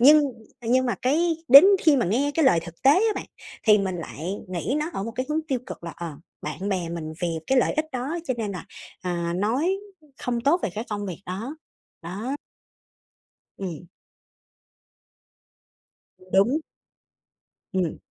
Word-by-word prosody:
nhưng 300 +4 +8 0.4
nhưng 255 +3 +3
mà 240 - +1
cái 325 +6 +2
đến 275 +7 +11 0.2
khi 310 -3 +6
mà 240 - +2
nghe 265 +9 +1
cái 320 - +3
lời 170 -10 +5
thực 170 0 -11
tế 270 - +7
á 430 +6 +3
bạn, - - -5 0.4
thì 210 -2 +6
mình 190 -2 -1
lại 170 +2 -5
nghĩ 185 +9 -2
nó 310 - -2
ở 195 - -3
một 230 - -4
cái 255 +1 -2
hướng 305 +1 +1
tiêu 260 -3 +1
cực 175 - -8
là, 170 - -5
ờ, 170 -3 -5 0.3
bạn 150 +7 -4
bè 180 -4 -1
mình 160 -2 -5
vì 175 - +2 0.2
cái 265 -1 +3
lợi - - +3
ích 310 0 -1
đó 265 +7 -2
cho 255 - -1
nên 210 -3 -2
là, 180 - -6 0.4
à, 170 -1 -1
nói 245 - +1 0.5
không 240 -1 -1
tốt 305 +8 +3
về - - 0
cái 220 +3 -3
công 205 -1 -3
việc 185 0 -6
đó. 225 - -5 0.5
Đó. 210 +11 -4 1.2
Ừm. 180 -3 -5 2.5
Đúng. 235 +11 +4 1.1
Ừm. 180 -4 0
220 Hz, 170 wpm, -25 LUFS, 180-275 Hz, 2.5 s, đến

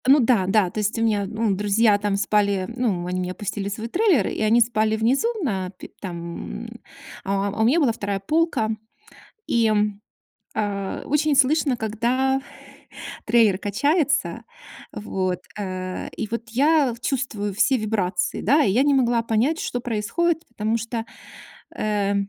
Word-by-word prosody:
Ну, 280 +3 +7
да, 230 -6 +3
да. 195 -2 +3
То 215 - -4
есть 210 +3 -1
у 225 - 0
меня, 210 -3 +1
ну, 220 +1 -1
друзья 210 +2 +3
там 205 -1 0
спали, 200 -1 +1
ну, 210 -9 -1
они 180 +1 -2
меня 180 0 -3
пустили 200 -1 -4
в - - -3
свой 225 +2 -5
трейлер, 345 - +2
и - - -4
они 220 +2 +4
спали 220 -2 +2
внизу, 240 - +2 0.2
на 190 -9 -1
пе 190 - -12
там, 170 -3 -6 0.6
а, 195 +1 0
а 210 +2 -3
у - - +4
меня 275 +9 +4
была 275 -7 +3
2 205 -3 -3
полка. 310 - +1 0.8
И, 230 -1 +2 0.9
а-а, 200 -2 -3
очень 300 0 +1
слышно, 275 -1 +3
когда 245 +5 0 0.9
трейлер 220 -4 +4
качается, 285 - 0 0.5
вот, 185 -3 -2 0.2
э, 185 -2 -4
и - - -3
вот 230 0 -4
я 280 +1 +3
чувствую 235 -7 -2
все 265 +6 +3
вибрации, 205 -5 -1
да. 290 +6 +4
И 195 - +2
я 245 +6 +3
не 285 0 +3
могла 240 -3 +2
понять, 230 +8 +1
что 245 - -3
происходит, 300 +9 -1
потому 220 0 -1
что, 230 0 -4 0.7
э-э, 205 -1 0
220 Hz, 155 wpm, -23 LUFS, 200-255 Hz, 0.9 s, Ну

